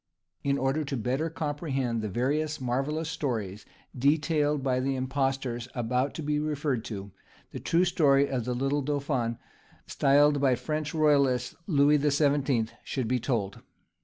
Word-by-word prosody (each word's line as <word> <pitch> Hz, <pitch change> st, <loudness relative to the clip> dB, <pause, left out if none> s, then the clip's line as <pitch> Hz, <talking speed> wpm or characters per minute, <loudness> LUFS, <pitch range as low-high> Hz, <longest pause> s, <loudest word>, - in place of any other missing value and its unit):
In 140 Hz, 0 st, +1 dB
order 135 Hz, +3 st, 0 dB
to 140 Hz, -2 st, -3 dB
better 130 Hz, +8 st, -1 dB
comprehend 145 Hz, -7 st, -2 dB
the 105 Hz, -, -3 dB
various 145 Hz, +8 st, -1 dB
marvellous 135 Hz, +5 st, -1 dB
stories 115 Hz, -11 st, -3 dB, 0.3 s
detailed 150 Hz, +1 st, +1 dB
by 130 Hz, -2 st, +1 dB
the 135 Hz, +1 st, 0 dB
impostors 130 Hz, -2 st, -2 dB
about 125 Hz, +3 st, -1 dB
to 160 Hz, -, -5 dB
be 150 Hz, 0 st, 0 dB
referred 145 Hz, -5 st, -1 dB
to, 100 Hz, -2 st, -6 dB, 0.4 s
the -, -, -6 dB
true 175 Hz, +2 st, +2 dB
story 140 Hz, -5 st, +3 dB
of 125 Hz, -5 st, -2 dB
the 125 Hz, 0 st, -2 dB
little 135 Hz, +3 st, 0 dB
dauphin, 135 Hz, -5 st, -1 dB, 0.5 s
styled 145 Hz, +1 st, +3 dB
by 130 Hz, -3 st, +4 dB
the -, -, -10 dB
French 155 Hz, 0 st, -3 dB
royalists 140 Hz, -5 st, +2 dB
Louis 145 Hz, -3 st, +4 dB
the 145 Hz, +1 st, +1 dB
Seventeenth, 140 Hz, -5 st, +1 dB
should 130 Hz, -4 st, -3 dB
be 125 Hz, +2 st, +1 dB
told. 110 Hz, -6 st, -2 dB
140 Hz, 155 wpm, -28 LUFS, 125-150 Hz, 0.5 s, by